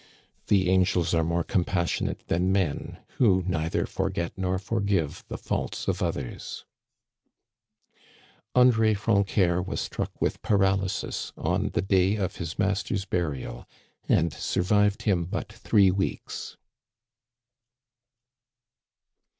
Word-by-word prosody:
The 95 -3 +3
angels 90 -2 +2
are 80 -1 +3
more 85 +1 0
compassionate 85 -2 -1
than 90 +3 +1
men, 95 -7 -1 0.2
who 95 -7 +4
neither 80 -3 0
forget 85 0 -2
nor 95 -1 -1
forgive 100 -6 -1
the - - -5
faults - - -3
of - - 0
others! 65 -4 -4 1.9
André 115 -4 +5
Francœur 100 -4 +2
was 95 - -4
struck - - -4
with - - -1
paralysis 95 -2 0
on - - 0
the - - 0
day 95 +1 +3
of 95 -4 -2
his 85 -2 -5
master's 100 0 0
burial, 80 -9 -3 0.4
and 85 -1 +3
survived 105 +3 +1
him 90 -5 +1
but 100 +4 -5
three 105 -4 +3
weeks. 95 +1 -3
95 Hz, 110 wpm, -27 LUFS, 85-100 Hz, 1.9 s, André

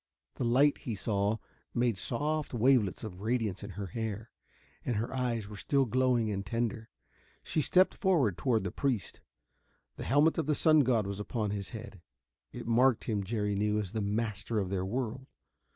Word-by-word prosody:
The - - -1
light, 135 +5 +4
he 115 - -4
saw, 100 +1 0 0.4
made 120 -2 +2
soft 150 +4 -2
wavelets 120 -5 +3
of 95 -4 -7
radiance 110 -3 -1
in 100 - -6
her 100 +1 -5
hair, 110 +3 -4 0.5
and 120 - -1
her 115 +5 -2
eyes 120 -5 -1
were 105 - -9
still 135 +6 +1
glowing 125 -2 +2
and 100 -1 -2
tender. 115 +2 -2 0.5
She 155 - 0
stepped 185 +5 +4
forward 160 - +2
toward 115 -2 +1
the 90 - -3
priest. 125 -9 -2 0.8
The - - -5
helmet 150 +4 +3
of 155 - -1
the 150 - +2
sun 155 +1 +5
god 120 -6 +3
was 100 0 -4
upon 105 0 -2
his 100 -1 -4
head. 110 -5 -9 0.5
It - - -7
marked 120 +1 +3
him, 105 -4 -1
Jerry 105 0 -1
knew, 105 +1 +1
as 100 -4 -2
the 110 - -2
master 105 +1 -2
of 95 -3 -1
their 95 -2 0
world. 130 +3 -3
115 Hz, 180 wpm, -31 LUFS, 105-130 Hz, 0.8 s, sun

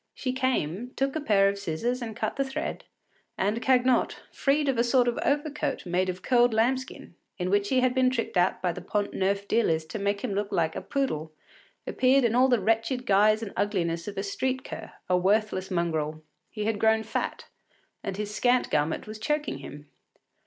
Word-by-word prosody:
She 255 -2 -2
came, 250 - -1
took 270 +1 -1
a 315 - -1
pair 200 -8 +4
of 200 0 -1
scissors 230 +8 -2
cut - - -2
the 275 - +1
thread, 270 0 -4 0.5
and 210 +4 0
Cagnotte, 255 -1 +3
freed 290 +1 +1
of 265 -4 +1
a - - +5
sort 245 0 +3
of 240 - 0
overcoat 295 -3 -1
made 180 +1 0
of 185 0 -5
curled 245 -2 +3
lambskin, 260 +4 -1 0.2
in 180 -1 -2
which 205 0 +2
he 260 -1 +3
had 255 0 +2
been 260 0 +3
tricked 245 -3 -3
out 180 +1 +2
by 180 - +2
the - - -7
Pont 205 -1 -2
Neuf 200 +1 0
dealers 160 -9 +1
to 210 - -6
make 200 0 -1
him 235 -6 -2
look 200 +1 -2
like 160 -2 0
a - - -3
poodle, 160 - -2 0.5
appeared 260 +1 +3
in 230 -2 +2
all 255 +2 +5
the 245 -3 +3
wretched 225 +4 0
guise 215 +1 +4
and 205 - -6
ugliness 170 -5 -1
of 205 - -6
a 195 - -1
street 260 +6 -2
cur, - - -8 0.2
a 180 - +3
worthless 190 +1 +1
mongrel. 160 -3 -1 0.3
He 210 -1 -4
had 220 -1 0
grown 220 0 +3
fat, 220 - -3 0.6
and 195 -1 -4
his 210 0 -4
scant 245 +3 +2
garment 150 +1 0
was 215 0 -8
choking 300 +5 -1
him. 145 +1 -10
215 Hz, 195 wpm, -27 LUFS, 190-255 Hz, 0.6 s, a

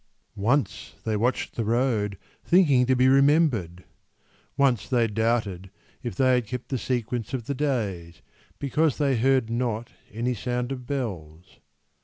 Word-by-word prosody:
Once 115 +3 -1
they 110 - -1
watched 120 +5 -1
the 115 - -1
road, 110 -3 0 0.3
Thinking 145 -9 +4
to 130 - +3
be 130 +1 +4
remembered. 135 - +3 0.7
Once 135 -6 +2
they 120 -3 +3
doubted 110 -4 -1 0.3
If 120 - -5
they 130 -2 +3
had 125 -3 +1
kept 125 +2 -6
the 130 - -1
sequence 120 -1 -2
of 120 -4 -5
the 140 - -2
days, 105 - -3 0.3
Because 150 +2 0
they 140 -3 +2
heard 130 -1 +2
not 115 -1 -2 0.2
any 120 +4 -1
sound 125 +2 -3
of 125 -2 -6
bells. 90 - -5
120 Hz, 145 wpm, -25 LUFS, 110-130 Hz, 0.7 s, Thinking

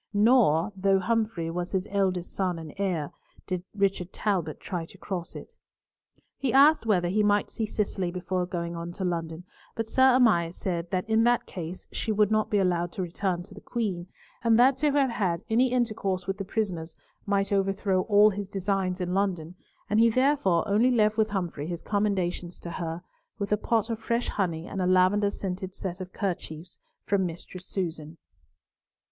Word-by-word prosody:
Nor, 205 - +4
though 195 0 +3
Humfrey 215 -4 -1
was 175 +2 -4
his 190 0 0
eldest 185 -3 0
son 185 -3 -1
and 160 -2 -8
heir, 175 -7 -1 0.3
did 180 -1 -3
Richard 195 -3 0
Talbot 180 -8 -1
try 180 -3 -4
to 170 - -13
cross 180 -3 -5
it. - - -9 0.9
He 265 -3 0
asked 280 -1 +5
whether 180 -5 +3
he 200 +5 +1
might 205 0 +2
see 220 - -2
Cicely 195 -4 -1
before 180 0 -2
going 170 -1 -4
on 170 +1 -5
to 190 +1 -4
London, 165 -1 -3 0.3
but 225 - -2
Sir 260 +3 +4
Amias 175 -9 +3
said 170 -2 -3
that 185 +2 -1
in 220 0 +3
that 240 0 +3
case 175 0 -7
she 225 - -2
would 210 0 +3
not 215 0 +2
be 210 - +2
allowed 175 -3 +1
to 190 - -3
return 175 0 -2
to 195 - -15
the 205 - -12
Queen, 195 -7 -3 0.4
and 230 -1 +4
that 255 +3 +6
to 295 +2 +2
have 275 -3 +3
had 180 -7 -1
any 245 +3 +3
intercourse 215 -7 -1
with 195 +1 -3
the 195 - -3
prisoners 180 -6 -3 0.3
might 200 0 +1
overthrow 195 -1 +1
all 210 +1 +5
his 200 0 -5
designs 195 -1 -1
in 180 0 -2
London, 180 -4 -1 0.3
and 210 - +2
he 230 +1 +6
therefore 230 - +2
only 215 +5 +3
left 215 -3 +3
with 220 -1 +2
Humfrey 175 -7 -3
his 170 -1 -5
commendations 185 -4 -1
to 170 - -6
her, 165 0 -4 0.3
with 200 -1 -4
a - - +5
pot 225 +1 0
of 225 - -3
fresh 235 +1 -1
honey 170 -5 -2
and 190 - -4
a 180 - +1
lavender 185 +3 +4
scented 190 -1 -5
set 185 0 -5
of 185 0 -7
kerchiefs 175 -3 -5 0.3
from 200 -1 +1
Mistress 175 +2 -9
Susan. 165 -4 -4
195 Hz, 185 wpm, -27 LUFS, 175-215 Hz, 0.9 s, that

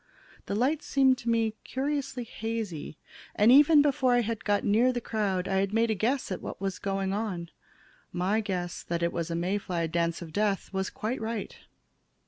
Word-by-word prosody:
The 200 - -2
light 270 +8 +1
seemed 265 -2 +3
to 235 - -3
me 225 -1 +2
curiously 270 -2 -2
hazy, 220 -10 -5 0.4
and 215 +3 +5
even 290 +2 +7
before 265 -3 +2
I 245 - +3
got 210 -2 -1
near 230 +5 +4
the 245 - -2
crowd 200 -5 -1
I 190 - 0
had 195 +2 0
made 230 0 +3
a - - +3
guess 230 +4 -1
at 185 - -3
what - - -7
was 195 -1 -3
going 195 -1 -1
on. 190 -5 -3 0.6
My 185 +5 +1
guess 180 -4 -3
that 170 0 -3
it 170 - 0
was 170 -1 -2
a 165 - -2
May 180 +4 0
fly 175 -4 -2
dance 170 0 -1
of 160 -2 -11
death 205 -1 0
was 190 0 -1
quite 235 0 -4
right. 225 -1 -4
210 Hz, 190 wpm, -28 LUFS, 185-240 Hz, 0.6 s, even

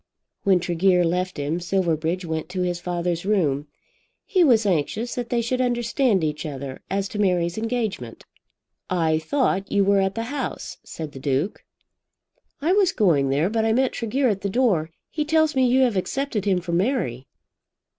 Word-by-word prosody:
When 190 -2 +3
Tregear 180 +1 +2
left 180 +2 -1
him, 145 +4 -2
Silverbridge 175 -1 -1
went 160 0 -3
to 180 0 -2
his 175 -1 -1
father's 175 -1 -2
room. 155 -8 +1 0.6
He 370 -4 +3
was 235 -8 +4
anxious 200 +6 0
that 245 -1 -4
they 235 -1 +1
should 255 +2 0
understand 240 -4 +1
each 150 -1 -2
other 140 -3 -6
as 195 0 -1
to 210 - -5
Mary's 175 -3 +1
engagement. 220 - -3 0.7
"I 160 -3 +1
thought 195 - 0
you 200 -1 +3
were 200 0 +4
at 190 0 0
the 230 - -2
House," 285 - -4
said 155 -2 -7
the 135 - -9
Duke. 140 +8 -1 1.0
"I 340 +4 +3
was 390 -2 +4
going 160 - +3
there, 145 +5 +2
but 220 +2 0
I 220 0 +2
met 260 +2 +2
Tregear 255 +4 0
at 200 -4 0
the 200 - -2
door. 195 -9 +1 0.2
He 305 - -1
tells 315 0 +2
me 260 -1 +4
you 255 +2 +3
have 245 -5 +3
accepted 235 +1 -2
him 190 -3 +2
for 175 0 -5
Mary." 170 - -1
190 Hz, 175 wpm, -23 LUFS, 165-235 Hz, 1.0 s, was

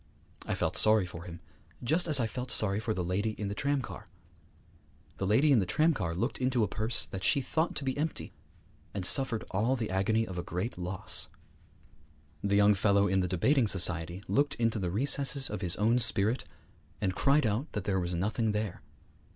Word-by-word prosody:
I - - -1
felt - - 0
sorry 110 -2 +5
for 85 -1 -9
him, 85 -1 -9 0.4
just 160 +9 +1
as 150 -4 +3
I 120 - +1
felt 125 +3 -5
sorry 100 -1 +2
for 110 0 -3
the 95 -4 -2
lady 100 +5 -1
in 105 -2 -3
the - - -3
tramcar. 140 +1 -3 1.1
The 95 - -2
lady 130 +9 +4
in 130 - +5
the 95 - 0
tramcar 105 - +1
looked 90 - -2
into 130 -2 +1
a - - +1
purse 110 +4 -1
that 95 -1 -7
she 140 - +3
thought 160 +5 -1
to - - -2
be 130 -1 -2
empty, 155 +2 -3 0.6
and 95 -3 -2
suffered 125 0 0
all 110 +7 +1
the 115 -6 -4
agony 110 +4 +1
of 90 -3 -6
a - - -4
great 90 +8 -4
loss. 90 +1 -1 1.2
The 100 0 +1
young 105 +1 +5
fellow 100 0 +2
in 95 0 +1
the 90 - 0
debating 115 - +2
society 90 -1 +2
looked 145 +1 +1
into 115 -1 0
the 90 -2 -2
recesses 140 +6 +1
of - - -4
his 90 -3 0
own 115 +4 +2
spirit, 115 0 +2 0.5
and 95 -2 -1
cried 140 +7 +2
out 110 +7 -1
that 105 - -3
there 95 -1 0
was 90 0 -3
nothing 105 +4 -1
there. 105 -3 -3
105 Hz, 195 wpm, -30 LUFS, 95-125 Hz, 1.2 s, sorry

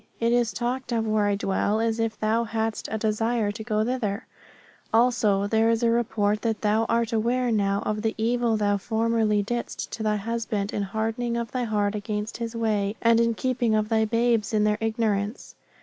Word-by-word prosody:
It 230 0 +2
is 240 -2 +2
talked 250 +2 -3
of 225 -1 0
where 215 -1 +1
I 205 - +2
dwell 200 +2 0
as 225 0 0
if 225 -1 -1
thou 220 +2 +1
hadst 225 -1 -3
a 220 - -1
desire 220 0 0
to 220 +2 -7
go 215 -1 0
thither; 225 -5 -2 0.7
also, 225 -4 +3
there 220 +2 +2
is 230 +1 +1
a 230 - +4
report 215 -3 +1
that 225 -2 -1
thou 215 +1 +2
art 230 0 +1
aware 240 +2 +1
now 200 -2 +1
of 215 0 -1
the 220 0 -1
evil 230 0 +1
thou 205 -1 +1
formerly 220 -1 +1
didst 240 +3 -4
to - - -6
thy 215 -1 +1
husband 215 -1 -2
in 205 - -1
hardening 225 +4 -2
of 235 -1 -3
thy 250 -1 -1
heart 205 -2 0
against 210 0 -4
his 230 0 -5
way, 210 -3 0
and 230 0 +4
in 230 -1 +2
keeping 245 -2 0
of 215 0 0
thy 220 -1 +3
babes 230 -1 +1
in 210 - +3
their 210 0 +1
ignorance. 220 -1 -1
220 Hz, 195 wpm, -25 LUFS, 210-230 Hz, 0.7 s, a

